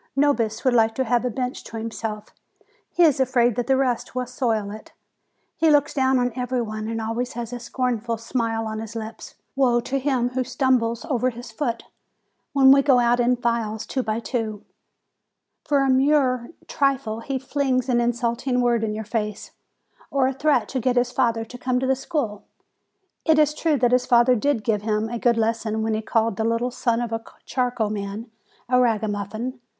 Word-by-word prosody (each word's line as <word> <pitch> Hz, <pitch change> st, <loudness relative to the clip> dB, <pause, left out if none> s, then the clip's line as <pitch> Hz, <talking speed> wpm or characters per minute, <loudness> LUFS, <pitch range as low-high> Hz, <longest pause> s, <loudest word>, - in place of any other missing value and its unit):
Nobis 235 Hz, -5 st, +1 dB
would 255 Hz, -, +4 dB
like 225 Hz, -1 st, +3 dB
to 260 Hz, -, +1 dB
have 245 Hz, 0 st, +1 dB
a -, -, +1 dB
bench 250 Hz, +2 st, -4 dB
to 225 Hz, -, -7 dB
himself; 220 Hz, -1 st, -5 dB, 0.6 s
he 350 Hz, -, +2 dB
is 300 Hz, -5 st, +4 dB
afraid 245 Hz, -3 st, +2 dB
that 245 Hz, -1 st, -2 dB
the 265 Hz, -1 st, +3 dB
rest 255 Hz, -2 st, -1 dB
will 255 Hz, 0 st, -1 dB
soil 230 Hz, -5 st, -1 dB
it; 215 Hz, +1 st, -11 dB, 0.6 s
he 325 Hz, -, +3 dB
looks 290 Hz, -1 st, +3 dB
down 265 Hz, -2 st, +2 dB
on 245 Hz, -1 st, 0 dB
everybody 235 Hz, -4 st, -3 dB
and 225 Hz, 0 st, -3 dB
always 230 Hz, +3 st, -3 dB
has 235 Hz, 0 st, -5 dB
a 245 Hz, -, -4 dB
scornful 235 Hz, -1 st, -2 dB
smile 225 Hz, -1 st, -2 dB
on 220 Hz, 0 st, -4 dB
his 225 Hz, +1 st, -7 dB
lips: 220 Hz, 0 st, -7 dB, 0.2 s
woe 250 Hz, -3 st, +3 dB
to 270 Hz, +3 st, -2 dB
him 255 Hz, -3 st, 0 dB
who 255 Hz, +1 st, -1 dB
stumbles 250 Hz, -3 st, 0 dB
over 255 Hz, -2 st, +1 dB
his 240 Hz, 0 st, -9 dB
foot, 235 Hz, -1 st, -3 dB, 0.7 s
when 270 Hz, -1 st, +6 dB
we 275 Hz, 0 st, +7 dB
go 270 Hz, -2 st, +4 dB
out 240 Hz, 0 st, +3 dB
in 245 Hz, +1 st, +3 dB
files 235 Hz, -3 st, -2 dB
two 265 Hz, -, -2 dB
by 220 Hz, -2 st, -2 dB
two! 225 Hz, -3 st, -4 dB, 1.0 s
For 285 Hz, -2 st, +2 dB
a 270 Hz, -, +1 dB
mere 260 Hz, -2 st, +2 dB, 0.2 s
trifle 270 Hz, -6 st, 0 dB
he 265 Hz, +4 st, -3 dB
flings 265 Hz, -1 st, -1 dB
an 240 Hz, -2 st, +2 dB
insult 235 Hz, +1 st, -1 dB
ing 250 Hz, -1 st, +2 dB
word 240 Hz, -2 st, +2 dB
in 210 Hz, -1 st, -1 dB
your 220 Hz, 0 st, -5 dB
face, 210 Hz, -2 st, -3 dB, 0.6 s
or 275 Hz, -2 st, +2 dB
a 265 Hz, -, -1 dB
threat 265 Hz, -5 st, +1 dB
to 265 Hz, -, -2 dB
get 250 Hz, +1 st, +1 dB
his 245 Hz, 0 st, +2 dB
father 230 Hz, -4 st, +1 dB
to 245 Hz, +2 st, -11 dB
come 250 Hz, 0 st, 0 dB
to 260 Hz, -, -1 dB
the 265 Hz, 0 st, +2 dB
school. 260 Hz, -7 st, -3 dB, 0.8 s
It 320 Hz, -1 st, +4 dB
is 300 Hz, -1 st, +4 dB
true 305 Hz, -1 st, +1 dB
that 245 Hz, -1 st, +2 dB
his 250 Hz, 0 st, +2 dB
father 240 Hz, 0 st, +5 dB
did 245 Hz, -1 st, 0 dB
give 210 Hz, -1 st, 0 dB
him 215 Hz, +1 st, -1 dB
a 240 Hz, 0 st, -4 dB
good 235 Hz, -1 st, +2 dB
lesson 220 Hz, -1 st, 0 dB
when 220 Hz, 0 st, 0 dB
he 215 Hz, -, -1 dB
called 225 Hz, -2 st, 0 dB
the 220 Hz, -, 0 dB
little 230 Hz, +2 st, 0 dB
son 240 Hz, -1 st, 0 dB
of 235 Hz, -1 st, -3 dB
the 225 Hz, 0 st, -3 dB, 0.2 s
charcoal 245 Hz, -4 st, -1 dB
man 210 Hz, +2 st, -5 dB, 0.4 s
a 250 Hz, 0 st, +3 dB
ragamuffin. 220 Hz, +2 st, -1 dB
240 Hz, 195 wpm, -23 LUFS, 225-260 Hz, 1.0 s, we